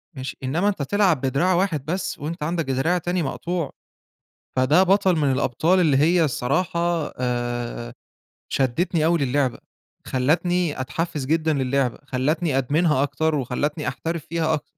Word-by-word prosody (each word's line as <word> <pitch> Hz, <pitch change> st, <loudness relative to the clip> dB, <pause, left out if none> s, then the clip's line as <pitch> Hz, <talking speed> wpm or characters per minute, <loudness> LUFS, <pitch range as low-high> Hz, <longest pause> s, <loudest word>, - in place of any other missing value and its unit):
ماشي، 130 Hz, 0 st, -6 dB
إنّما 160 Hz, +10 st, 0 dB
أنت 195 Hz, -8 st, -3 dB
تلعب 185 Hz, -2 st, +2 dB
بدراع 140 Hz, +8 st, +1 dB
واحد 175 Hz, -6 st, 0 dB
بس، 180 Hz, +4 st, -3 dB
وأنت 160 Hz, +3 st, -4 dB
عندك 165 Hz, +1 st, -1 dB
دراع 150 Hz, +8 st, +1 dB
تاني 175 Hz, 0 st, -1 dB
مقطوع، 170 Hz, +3 st, -3 dB, 0.8 s
فده 145 Hz, +8 st, +4 dB
بَطَل 190 Hz, -1 st, +3 dB
من 145 Hz, -4 st, +2 dB
الأبطال 145 Hz, +8 st, +2 dB
اللي 155 Hz, -6 st, +3 dB
هي 165 Hz, +4 st, +4 dB
الصراحة 170 Hz, +4 st, -1 dB
آآ، 120 Hz, -1 st, -3 dB, 0.6 s
شدّتني 155 Hz, +5 st, 0 dB
أوي 170 Hz, +1 st, +3 dB
لللعبة، 135 Hz, -2 st, 0 dB, 0.5 s
خلّتني 160 Hz, +4 st, +1 dB
أتحفّز 150 Hz, +1 st, -3 dB
جدًا 160 Hz, +1 st, +1 dB
لللعبة، 135 Hz, -2 st, 0 dB
خلّتني 140 Hz, +3 st, 0 dB
أدمنها 145 Hz, +2 st, +2 dB
أكتر، 160 Hz, +2 st, 0 dB
وخلّتني 145 Hz, +3 st, -2 dB
أحترف 165 Hz, -2 st, -4 dB
فيها 160 Hz, -1 st, 0 dB
أكتر. 150 Hz, -, -3 dB
155 Hz, 140 wpm, -23 LUFS, 130-170 Hz, 0.8 s, فده